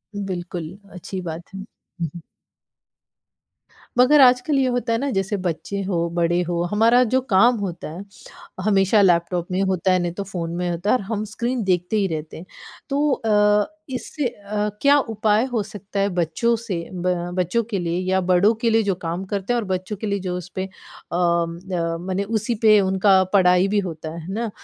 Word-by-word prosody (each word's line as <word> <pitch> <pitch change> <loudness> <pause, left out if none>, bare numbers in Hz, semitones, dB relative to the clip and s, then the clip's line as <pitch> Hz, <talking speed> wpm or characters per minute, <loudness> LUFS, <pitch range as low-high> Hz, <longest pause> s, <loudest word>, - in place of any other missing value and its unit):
बिल्कुल, 180 -3 -5 0.2
अच्छी 185 +1 -6
बात 170 +2 -7
है। 195 - -7
हुँ, 180 -5 -8
हुँ। 170 - -8 1.8
मगर 270 +4 +6
आजकल 255 +3 +4
ये 265 -1 +2
होता 245 -2 0
है 230 - +1
ना, 280 +1 -1
जैसे 195 0 -1
बच्चे 185 +2 -3
हों, 170 -3 -1
बड़े 175 +1 +2
हों, 175 0 0
हमारा 230 +4 +5
जो 260 - +5
काम 235 +6 +5
होता 180 -5 -5
है, 180 +5 -7 0.6
हमेशा 200 +1 +3
लैपटॉप 175 -1 +2
में 185 +1 0
होता 190 -1 +1
है 185 - +3
नहीं 175 -1 -1
तो 200 - -4
फ़ोन 175 -4 -5
में 180 0 -2
होता 175 +4 -2
है - - +5
और 255 - -1
हम 215 -1 -1
स्क्रीन 235 +3 -2
देखते 180 +2 0
ही 200 -2 +2
रहते 160 -2 -5
हैं। 170 - -10 0.4
तो 290 +2 +1
अ, 210 -2 +3 0.2
इससे 265 +3 -4
अ, 210 0 -3
क्या 285 +1 +6
उपाय 220 -3 +1
हो 245 -4 -1
सकता 200 0 -7
है 200 +1 +2
बच्चों 175 +8 +1
से 225 -4 -4 0.2
ब 180 0 0 0.2
बच्चों 185 +6 +1
के 200 -4 -1
लिए 170 -1 -2
या 190 - +3
बड़ों 190 +5 +5
के 235 - +2
लिए 225 0 +3
जो 200 - +1
काम 170 +1 -4
करते 200 +3 -2
हैं 240 - +1
और 215 - -4
बच्चों 185 +2 -3
के 215 - -2
लिए 200 0 -1
जो 180 -1 -3
उसपे 185 +1 -5
अ - - -11 0.5
अ, 170 0 -1
माने 190 +2 -2
उसी 220 +2 -1
पे 215 -2 +6
उनका 190 0 +4
पढ़ाई 180 -1 +5
भी 205 +1 +1
होता 165 -5 -5
है, 170 - -7
है 185 +4 -7
ना? 230 +1 -2
195 Hz, 195 wpm, -22 LUFS, 175-220 Hz, 1.8 s, मगर